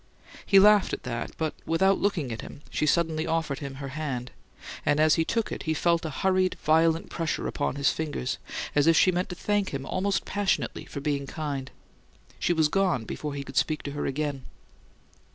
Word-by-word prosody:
He 195 - +4
laughed 205 0 +6
at - - -4
that; 120 -1 -3
but 160 -1 -1
without 190 +4 +2
looking 165 -11 0
at 115 - -4
him 145 - -11
she 150 - 0
suddenly 160 0 +1
offered 160 -4 -1
him 140 -1 -6
her 140 0 -6
hand, 130 -4 -4 0.5
and, 145 0 +2
as 155 0 +5
he 165 - +3
took 230 +6 -1
it, - - -4
he 160 - +2
felt 170 +1 +2
a 160 - -2
hurried, 185 +4 +1
violent 160 +1 +3
pressure 165 -2 -2
upon 145 - -1
his 140 0 +2
fingers, 150 - -3 0.3
as 145 +1 +3
if 165 -1 +6
she 185 - +5
meant 180 +1 -1
to 180 - -5
thank 205 +1 0
him 135 -1 -4
almost 195 +5 -1
passionately 205 -1 -1
for 140 - -7
being 140 -1 -1
kind. 140 -3 -4 0.7
She - - +1
was 160 -3 +3
gone 180 -8 +1
before 150 +5 -5
he 140 - -4
could 135 -1 -8
speak 155 -1 +1
to 140 - -4
her 145 - -3
again. 140 -1 -2
155 Hz, 200 wpm, -27 LUFS, 140-175 Hz, 0.7 s, laughed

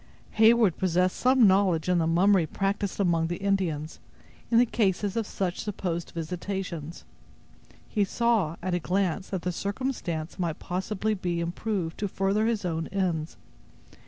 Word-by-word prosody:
Heyward 220 -4 +5
possessed 185 0 +1
some 255 -1 +4
knowledge 190 -4 +3
of 180 -1 +3
the 160 - +1
mummery 180 +1 +4
practised 200 +3 -2
among 170 -4 +2
the 175 - -2
Indians, 180 -6 -1 0.5
in 230 - +3
the 245 - +6
cases 205 -3 0
of 225 -3 -1
such 185 -2 -3
supposed 175 -5 -3
visitations. 170 -1 -5 0.8
He 210 - +1
saw, 215 -5 +1
at 185 - -1
a 175 - +1
glance, 185 0 -1
that 190 -3 -3
the 180 - -1
circumstance 190 -6 -3
might 170 -3 -1
possibly 190 +4 -2
be 175 -4 -2
improved 175 0 -3
to 205 - 0
further 195 +3 0
his 220 -4 -1
own 165 -2 -2
ends. 175 -5 -2
185 Hz, 150 wpm, -27 LUFS, 170-205 Hz, 0.8 s, the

